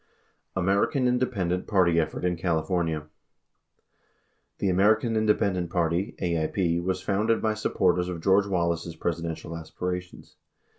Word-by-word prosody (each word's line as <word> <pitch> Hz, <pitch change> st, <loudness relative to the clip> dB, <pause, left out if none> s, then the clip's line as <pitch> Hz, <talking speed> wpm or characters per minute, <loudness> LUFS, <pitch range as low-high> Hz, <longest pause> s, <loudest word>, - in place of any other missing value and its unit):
American 100 Hz, -, +2 dB
Independent 100 Hz, -8 st, 0 dB
Party 85 Hz, -5 st, +3 dB
Effort 80 Hz, +2 st, -2 dB
in 90 Hz, -1 st, +1 dB
California: 80 Hz, -2 st, -1 dB, 1.5 s
The -, -, -1 dB
American 110 Hz, +5 st, +3 dB
Independent 100 Hz, -5 st, +1 dB
Party 85 Hz, +4 st, 0 dB
(AIP) 85 Hz, 0 st, 0 dB
was 95 Hz, 0 st, -1 dB
founded 110 Hz, +3 st, +1 dB
by 110 Hz, -1 st, +1 dB
supporters 90 Hz, -4 st, +1 dB
of 90 Hz, -2 st, -4 dB
George 100 Hz, +1 st, +4 dB
Wallace's 85 Hz, -3 st, -1 dB
Presidential 85 Hz, -1 st, -4 dB
aspirations. 90 Hz, +2 st, -6 dB
90 Hz, 110 wpm, -26 LUFS, 85-100 Hz, 1.5 s, George